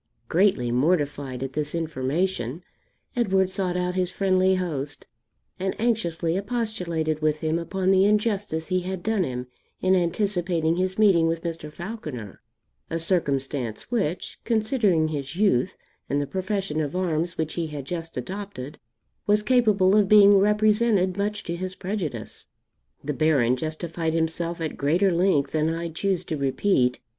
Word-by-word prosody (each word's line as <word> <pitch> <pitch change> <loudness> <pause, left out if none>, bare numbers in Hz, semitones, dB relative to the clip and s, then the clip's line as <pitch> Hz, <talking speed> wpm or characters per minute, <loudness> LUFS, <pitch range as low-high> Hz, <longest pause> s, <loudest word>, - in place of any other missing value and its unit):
Greatly 170 -10 +2
mortified 140 -2 0
at 135 0 -5
this 150 +2 -1
information, 160 -1 -2 0.5
Edward 190 -5 +2
sought 185 -2 -1
out 180 0 -1
his 185 -1 0
friendly 190 0 +2
host, 150 -6 -3 0.5
and 190 +1 -2
anxiously 175 -8 0
expostulated 185 -8 -2
with 155 0 +2
him 160 +1 0
upon 190 +2 0
the 190 0 +5
injustice 205 -6 +1
he 185 +1 0
had 185 0 -5
done 220 -3 +1
him 125 -4 -4 0.3
in 185 - +2
anticipating 175 -2 +1
his 185 +1 -1
meeting 190 -6 +5
with 165 0 -2
Mr. 165 -3 -5
Falconer, 155 - -7 0.5
a 165 - -1
circumstance 140 - -1
which, 190 -8 -2
considering 215 -8 +2
his 145 0 -4
youth 185 - +2 0.3
and 140 - +1
the 145 - -1
profession 190 -2 -2
of 150 +2 -3
arms 170 -2 -1
which 160 -1 -2
he 170 -2 -2
had 145 -3 -6
just 165 +1 -5
adopted, 195 -8 -6 0.5
was 210 0 +3
capable 210 -6 +4
of 205 -2 +4
being 205 -1 +8
represented 210 -2 +3
much 205 +1 -2
to 170 - -3
his 185 +1 -5
prejudice. 175 - -5 0.6
The 150 - -2
Baron 135 -5 +3
justified 160 +3 -3
himself 165 +1 -1
at 160 - -3
greater 170 +7 +2
length 170 -5 +2
than 155 0 +1
I 165 +1 -3
choose 185 +2 -1
to 160 - -3
repeat. 135 -2 +1
175 Hz, 150 wpm, -25 LUFS, 155-195 Hz, 0.6 s, being